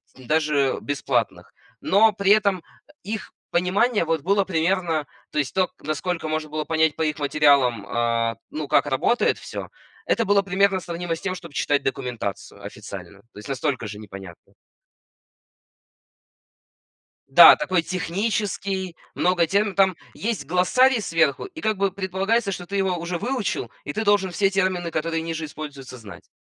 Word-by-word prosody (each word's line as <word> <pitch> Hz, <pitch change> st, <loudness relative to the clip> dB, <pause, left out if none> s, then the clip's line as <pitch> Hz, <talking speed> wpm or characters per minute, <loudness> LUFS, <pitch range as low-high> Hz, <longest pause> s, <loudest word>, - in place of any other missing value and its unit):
ть 130 Hz, -2 st, -15 dB
даже 150 Hz, -3 st, +1 dB
бесплатных. 145 Hz, -1 st, -2 dB, 0.3 s
Но 210 Hz, +2 st, +4 dB
при 200 Hz, 0 st, +2 dB
этом, 200 Hz, -3 st, +3 dB, 0.3 s
э, -, -, -19 dB
их 215 Hz, +1 st, -6 dB, 0.2 s
понимание 185 Hz, +3 st, +2 dB
вот 160 Hz, -2 st, 0 dB
было 195 Hz, +3 st, +2 dB
примерно, 165 Hz, -3 st, 0 dB, 0.3 s
то 150 Hz, -, -1 dB
есть 140 Hz, -, -1 dB
то, 185 Hz, -1 st, +2 dB
к -, -, -31 dB
насколько 155 Hz, +2 st, -3 dB
можно 155 Hz, -1 st, -2 dB
было 155 Hz, 0 st, -3 dB
понять 160 Hz, -1 st, +1 dB
по 160 Hz, -, -5 dB
их 150 Hz, -1 st, -1 dB
материалам, 140 Hz, -7 st, +3 dB
а, 115 Hz, +1 st, 0 dB
ну, 150 Hz, -1 st, -5 dB
как -, -, +4 dB
работает 185 Hz, -, +1 dB
всё. -, -, -7 dB, 0.4 s
Это 230 Hz, -, +1 dB
было 200 Hz, 0 st, +4 dB
примерно 195 Hz, 0 st, +2 dB
сравнимо 170 Hz, -1 st, -4 dB
с -, -, -11 dB
тем, 185 Hz, -1 st, -2 dB
чтоб 170 Hz, -5 st, -11 dB
читать 145 Hz, 0 st, +1 dB
документацию 120 Hz, -6 st, -4 dB
официальную. 100 Hz, -1 st, -9 dB
То -, -, -11 dB
есть 105 Hz, -, -10 dB
настолько 130 Hz, -3 st, -2 dB
же 105 Hz, 0 st, -8 dB
непонятно. 95 Hz, -5 st, -11 dB, 2.8 s
Да, -, -, +9 dB
такой 185 Hz, -3 st, 0 dB
технический. 190 Hz, 0 st, -2 dB, 0.2 s
Много 175 Hz, -2 st, +2 dB
терм 200 Hz, +2 st, +1 dB
там 190 Hz, -3 st, +3 dB, 0.2 s
есть 225 Hz, -1 st, -3 dB
глоссарий 240 Hz, +8 st, +3 dB
сверху, 160 Hz, -6 st, +1 dB
и 345 Hz, -5 st, -9 dB
как 215 Hz, -5 st, 0 dB
бы 195 Hz, 0 st, +1 dB
предполагается, 195 Hz, +3 st, -1 dB
что 175 Hz, -1 st, -6 dB
ты 200 Hz, -, -4 dB
его 190 Hz, -2 st, +1 dB
уже 170 Hz, +1 st, -4 dB
выучил, 235 Hz, -, -2 dB
и 145 Hz, -, -4 dB
ты 220 Hz, -, -2 dB
должен 200 Hz, -2 st, +3 dB
все 195 Hz, +2 st, +2 dB
термины, 185 Hz, -3 st, 0 dB
которые 165 Hz, +1 st, -1 dB
ниже 165 Hz, -1 st, -4 dB
используются, 145 Hz, -4 st, -8 dB
знать. 100 Hz, -3 st, -12 dB
170 Hz, 160 wpm, -23 LUFS, 145-195 Hz, 2.8 s, Да